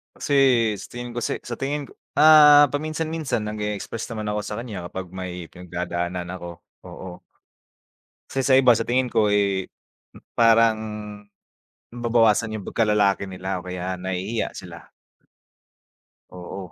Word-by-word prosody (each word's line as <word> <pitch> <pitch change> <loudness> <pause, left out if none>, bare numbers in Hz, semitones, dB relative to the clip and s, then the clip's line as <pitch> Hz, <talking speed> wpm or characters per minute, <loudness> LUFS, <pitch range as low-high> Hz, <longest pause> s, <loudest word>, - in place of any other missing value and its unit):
Kasi, 145 - -3 0.4
sa - - -9
tingin 120 0 -6
ko - - -8
kasi - - -1
sa 120 -1 -7
tingin 145 +2 -2
ko - - -16 0.2
ah, 150 -1 +8
paminsan-minsan 155 -3 -2
nag-e-express 105 +1 -4
naman 110 -1 -4
ako 105 0 -1
sa - - -5
kaniya 100 -8 -7
kapag 95 0 -7
may 90 -2 -7
pinagdadaanan 90 0 -4
ako, 85 -2 -7 0.4
oo. 90 -1 -9 1.1
Kasi 135 - -1
sa 130 - +5
iba, 130 -2 +6
sa 115 - -2
tingin 125 0 +1
ko, 105 -1 +3
eh, 100 -2 +1 0.7
parang, 115 -1 +5 1.1
nababawasan 115 -2 +2
'yong 100 - -7
pagkalalaki 105 -3 +2
nila 95 0 -4
o - - -18
kaya 90 +1 -4
nahihiya 95 +5 -3
sila. - - -11 1.4
Oo. 90 0 -8
105 Hz, 135 wpm, -23 LUFS, 90-120 Hz, 1.4 s, ah